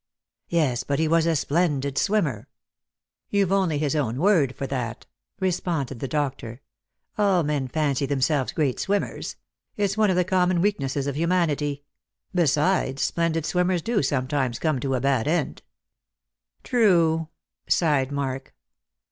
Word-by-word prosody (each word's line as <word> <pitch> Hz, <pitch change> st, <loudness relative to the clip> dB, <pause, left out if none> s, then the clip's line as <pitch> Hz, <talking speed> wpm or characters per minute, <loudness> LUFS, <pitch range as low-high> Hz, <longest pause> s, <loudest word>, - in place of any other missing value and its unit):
" -, -, -66 dB
Yes, 150 Hz, -8 st, +1 dB
but 140 Hz, -, -1 dB
he 160 Hz, -, +1 dB
was 165 Hz, +1 st, +3 dB
a 165 Hz, -, +2 dB
splendid 145 Hz, -3 st, 0 dB
swimmer." 155 Hz, -, 0 dB, 0.4 s
" -, -, -65 dB
You've 200 Hz, -2 st, +1 dB
only 190 Hz, -6 st, +2 dB
his 150 Hz, 0 st, 0 dB
own 125 Hz, -6 st, -1 dB
word 155 Hz, -6 st, +3 dB
for 140 Hz, -, -4 dB
that," 125 Hz, -4 st, -4 dB, 0.3 s
responded 170 Hz, -, -1 dB
the 135 Hz, -, -3 dB
doctor. 135 Hz, -4 st, -3 dB, 0.3 s
" -, -, -46 dB
All 195 Hz, -4 st, +3 dB
men 145 Hz, -3 st, -1 dB
fancy 140 Hz, -1 st, 0 dB
themselves 140 Hz, 0 st, 0 dB
great 145 Hz, -5 st, -1 dB
swimmers. 200 Hz, +1 st, -2 dB, 0.4 s
It's 200 Hz, -1 st, 0 dB
one 215 Hz, -2 st, +3 dB
of 185 Hz, -, +2 dB
the 180 Hz, -, +3 dB
common 185 Hz, -1 st, +2 dB
weaknesses 140 Hz, -8 st, 0 dB
of 140 Hz, -1 st, -2 dB
humanity. 150 Hz, -4 st, 0 dB, 0.5 s
Besides, 150 Hz, -4 st, +1 dB
splendid 165 Hz, -2 st, 0 dB
swimmers 180 Hz, -1 st, +1 dB
do 235 Hz, -2 st, +1 dB
sometimes 130 Hz, -2 st, -1 dB
come 155 Hz, -3 st, 0 dB
to 135 Hz, +1 st, -1 dB
a -, -, 0 dB
bad 135 Hz, -2 st, +1 dB
end." 170 Hz, +3 st, -1 dB, 0.5 s
" -, -, -50 dB
True," 170 Hz, -9 st, +3 dB, 0.4 s
sighed 145 Hz, -5 st, +2 dB
Mark. 135 Hz, -2 st, -4 dB
150 Hz, 150 wpm, -24 LUFS, 135-180 Hz, 0.5 s, was